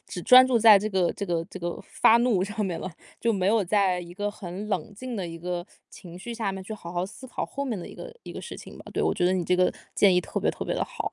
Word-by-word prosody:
只 175 - -6
专 255 0 +8
注 250 -2 +3
在 215 -2 +8
这 210 - -2
个 190 -4 +1
这 200 - -5
个 170 -2 -1
这 - - -7
个 175 0 -3
发 225 - +5
怒 235 -6 +2
上 210 +2 -2
面 180 -4 -3
了， 185 - -5 0.3
就 230 - +2
没 190 0 +1
有 220 -1 +3
在 190 -1 +2
一 175 0 -10
个 205 +2 -2
很 195 0 -7
冷 195 +1 -3
静 255 +4 -6
的 185 -5 -3
一 165 - -8
个 175 +1 -4 0.2
情 175 -2 -11
绪 240 +6 -7
下 225 -4 -2
面 190 -1 -7
去 220 - -7
好 170 -5 -8
好 175 +1 -1
思 220 +6 -10
考 255 - -4
后 280 0 -5
面 225 -6 -2
的 170 - -7
一 - - -11
个 - - -9
一 - - -9
个 - - -7
事 - - -8
情 - - -11
吧。 - - -12
对， - - 0
我 - - +2
觉 175 - +1
得 185 - +2
你 180 - -1
这 180 - +2
个 180 0 +3 0.2
建 195 -3 +5
议 180 - +4
特 - - -3
别 - - +2
特 - - -6
别 - - -2
得 - - -1
好。 435 -4 -4
195 Hz, 330 characters per minute, -26 LUFS, 180-220 Hz, 0.3 s, 专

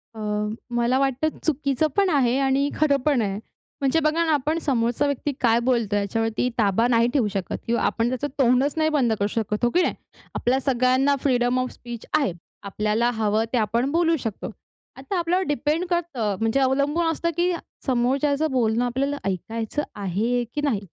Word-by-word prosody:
अ, - - -9 0.6
मला 240 +2 +2
वाटतं 275 +3 0
चुकीचं 295 -1 +1
पण 395 -1 +4
आहे 265 -5 +2
आणि 275 +1 +2
खरं 290 -2 +3
पण 285 -5 +3
आहे. 200 -1 -2 0.4
म्हणजे 275 +4 +2
बघा 315 +2 +1
ना, 320 - +1
आपण 300 +3 0
समोरचा 245 -2 0
व्यक्ती 285 +1 -1
काय 235 -2 +4
बोलतोय 230 -5 +1
याच्यावरती 225 +4 -1
ताबा 220 +1 +2
नाही 235 -1 +3
ठेवू 255 -7 +2
शकत 195 -3 -3
किंवा 235 +1 +1
आपण 230 +1 +1
त्याचं 255 +3 -2
तोंडच 260 +2 +3
नाही 315 0 +2
बंद 265 -7 +2
करू 200 - +1
शकत, 210 +1 -3
हो - - +3
की 360 - +4
नाही? - - +1 0.4
आपल्या 255 +2 +1
सगळ्यांना 260 +2 +2
फ्रीडम 245 -2 +2
ऑफ 255 0 -2
स्पीच 240 -2 -9
आहे. 275 -10 +1 0.3
आपल्याला 210 +4 0
हवं 220 0 +1
ते - - +3
आपण 235 +5 0
बोलू 330 +1 +2
शकतो. 225 -5 -5 0.5
आता 275 +8 -4
आपल्यावर 355 +2 +1
डिपेंड 295 +5 0
करतं, 285 - -1
म्हणजे 225 +4 +1
अवलंबून 280 +5 +1
असतं, 335 +1 -1
की 355 +1 +2 0.3
समोरच्याचं 275 +4 +1
बोलणं 235 -2 +1
आपल्याला 275 +4 -1
ऐकायचं 225 - -3
आहे 215 +5 -1
की 295 - 0
नाही? 275 -9 0
255 Hz, 175 wpm, -24 LUFS, 230-290 Hz, 0.6 s, पण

